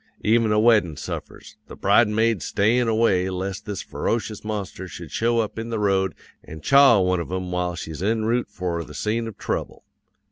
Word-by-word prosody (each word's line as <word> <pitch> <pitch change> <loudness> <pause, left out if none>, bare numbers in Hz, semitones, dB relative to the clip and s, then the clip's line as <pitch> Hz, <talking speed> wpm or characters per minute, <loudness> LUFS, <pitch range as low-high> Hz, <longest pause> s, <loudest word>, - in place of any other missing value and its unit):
Even 115 0 +3
a 105 - +3
weddin' 105 - +3
suffers; - - -8
the - - -10
bridesmaids 105 -1 +2
stayin' 115 +8 +2
away 110 -5 +2
lest 95 +1 -4
this 100 -3 -4
ferocious 110 -2 -3
monster 100 -3 -5
should 85 -3 -9
show 115 +6 +1
up 110 0 -5
in 115 +1 -5
the 115 - -2
road 95 -4 +1 0.3
an' 80 - -10
chaw 135 - +6
one 90 -1 +1
of 85 - -5
'em 95 -1 -3
while 90 -1 -1
she's 80 -1 -7
en 110 +2 0
route 120 0 0
for 90 -4 -3
the 75 - -12
scene 115 +2 -1
of 110 - -9
trouble. - - -4
105 Hz, 185 wpm, -23 LUFS, 90-115 Hz, 0.3 s, chaw